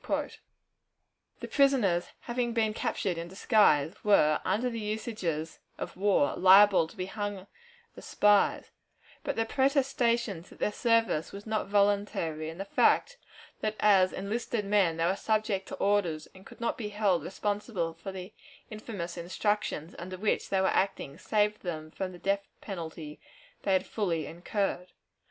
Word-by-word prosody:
The - - -5
prisoners, 245 -12 +2
having 240 -1 -2
been 220 -2 +1
captured 185 -4 -2
in 170 - -5
disguise, 180 - +3
were, 155 -7 +4
under 235 +5 0
the 230 -2 -3
usages 210 -7 -3 0.2
of - - -6
war, 195 -6 +2
liable 190 -2 +6
to 205 - -16
be 185 - -2
hanged 205 -1 -5 0.5
as - - -11
spies, 205 -1 +3 0.5
but - - -2
their 225 - 0
protestations 245 - +1
that - - -15
their - - 0
service 230 -8 +1
was 200 +1 -9
not 215 -2 -1
voluntary, 200 -6 +1
and 165 +2 -9
the 195 - -3
fact - - +2 0.4
that 215 0 -2
as 195 -3 +5
enlisted 210 +2 -3
men 195 -5 +2
they 165 - +1
were 185 +3 +2
subject 215 -2 -1
to - - -6
orders, 190 -6 0
and 190 +1 -15
could - - -14
not 235 +1 -2
be 210 -3 -3
held 205 -4 +1
responsible 200 -4 -2
for 165 +4 -8
the 190 +2 -8 0.4
infamous 205 -6 -6
instructions 175 -2 -2
under 185 +2 -6
which 210 +3 -1
they 190 -1 +2
were 190 - +3
acting, 175 -7 -1
saved 210 0 +1
them 155 -3 -5
from 185 +2 -4
the 180 - -11
death 195 +2 -1
penalty 160 -5 -7 0.4
they 195 - +1
had 185 0 +2
fully 170 -7 -2
incurred. 180 +1 -3
200 Hz, 155 wpm, -29 LUFS, 175-215 Hz, 0.5 s, liable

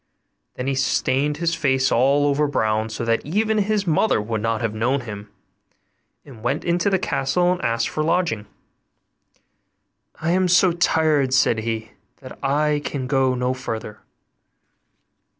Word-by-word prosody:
Then 125 - -5
he 135 - 0
stained 135 +2 0
his 170 -1 0
face 135 -4 +1
all 140 +4 +3
over 145 +1 +2
brown, 110 -5 0
so 110 +1 -4
that 115 0 0
even 215 +7 0
his 205 0 0
mother 170 - +2
would 110 +1 -3
not 115 0 -1
have 115 -2 -1
known 125 +5 0
him, 105 -3 -8 1.0
and 125 -6 -13
went 135 +6 -1
into 175 +3 +1
the 190 - +2
castle 175 +2 0
and 180 - -2
asked 115 0 0
for 155 - -3
a - - 0
lodging; 165 - 0 1.7
'I 160 +2 -1
am 185 +1 +2
so 180 +1 +4
tired,' 155 -5 +2
said 115 -3 +3
he, 110 0 -4 0.3
'that 130 0 -13
I 145 +2 +1
can 135 -3 -4
go 130 -1 +1
no 125 +1 -1
farther. 110 -4 -6
135 Hz, 155 wpm, -22 LUFS, 115-165 Hz, 1.7 s, so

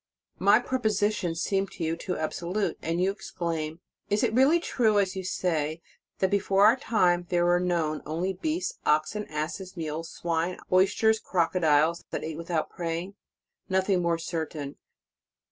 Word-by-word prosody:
My - - +6
propositions 210 -8 0
seem 195 0 0
to 175 - -7
you 160 +1 0
too 180 +2 -4
absolute, 175 +6 -2
and 165 +2 -1
you 185 +2 +2
exclaim: 165 -4 -4 0.3
"Is 205 +3 +1
it 225 -2 +1
really 270 +8 +5
true, 225 -10 +1
as 195 -1 +1
you 190 - -4
say, 160 -4 -1 0.4
that 190 0 +1
before 200 0 +3
our 220 +3 +7
time 180 -8 +1
there 175 -1 +2
were 175 0 +4
known 170 -4 0
only 170 +5 -2
beasts, 325 - -3
oxen, 155 +8 +1
asses, 170 +5 -5
mules, 160 0 -4
swine, 170 +1 -2
oys 190 +1 +4
ters, 220 0 +3
crocodiles, 165 -2 +2
that - - -4
ate 160 -1 -5
without 165 -1 -2
praying?" 170 +3 -4 0.6
Nothing 190 0 +2
more 170 -1 +1
certain. 160 -4 -4
180 Hz, 155 wpm, -27 LUFS, 165-200 Hz, 0.6 s, our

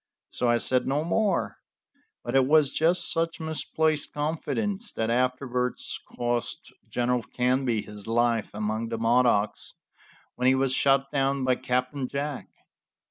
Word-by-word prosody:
So 125 - 0
I 120 - +4
said 130 +2 0
no 140 +3 +1
more, 190 +2 0 0.7
but - - -3
it 130 -1 +4
was 150 -2 +4
just 170 +2 +3
such 165 0 -1
misplaced 160 -1 -1
confidence 195 +8 -2
that 110 0 -1
afterwards 125 0 -1 0.2
cost 120 -1 -2 0.2
General 125 0 0
Canby 125 -2 0
his 105 0 -10
life 115 -1 +1
among 110 +2 -2
the 115 - -3
Modocs, 115 -3 +1 0.6
when 125 - 0
he 130 - +5
was 135 -1 +1
shot 135 0 +2
down 135 -1 0
by 130 0 +3
Captain 125 +2 -1
Jack. 140 +1 -4
130 Hz, 135 wpm, -26 LUFS, 120-150 Hz, 0.7 s, he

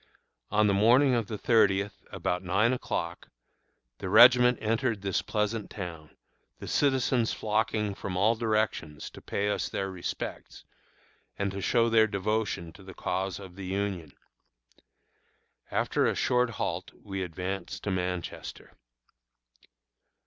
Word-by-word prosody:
On 105 +1 +3
the 100 - +3
morning 125 +7 +5
of 115 -4 0
the 110 - -4
thirtieth, 100 -3 +2
about 90 0 -2
nine 100 +6 +2
o'clock, 85 -9 -4 0.7
the - - -4
regiment 125 0 +7
entered 115 -1 -1
this 95 -2 0
pleasant 105 0 -2
town, 85 -6 -8 0.4
the - - -9
citizens 130 -4 +2
flocking 105 -1 0
from 95 -2 -5
all 105 +4 +4
directions 110 -9 -2
to - - -12
pay 100 - -2
us 105 - -1
their 95 0 -3
respects, 90 -2 -6 0.7
and 100 -1 -1
to 100 +1 -5
show 115 +4 +3
their 110 -1 +5
devotion 100 -4 -2
to 100 - -15
the 95 0 -11
cause 95 -1 -2
of 95 -3 -11
the 95 -1 -7
Union. 95 -5 -3 1.6
After - - +1
a - - 0
short 125 -1 +2
halt 115 - -3
we 95 -1 -4
advanced 90 +1 -5
to 100 - -1
Manchester. 90 -2 -4
100 Hz, 135 wpm, -28 LUFS, 95-115 Hz, 1.6 s, regiment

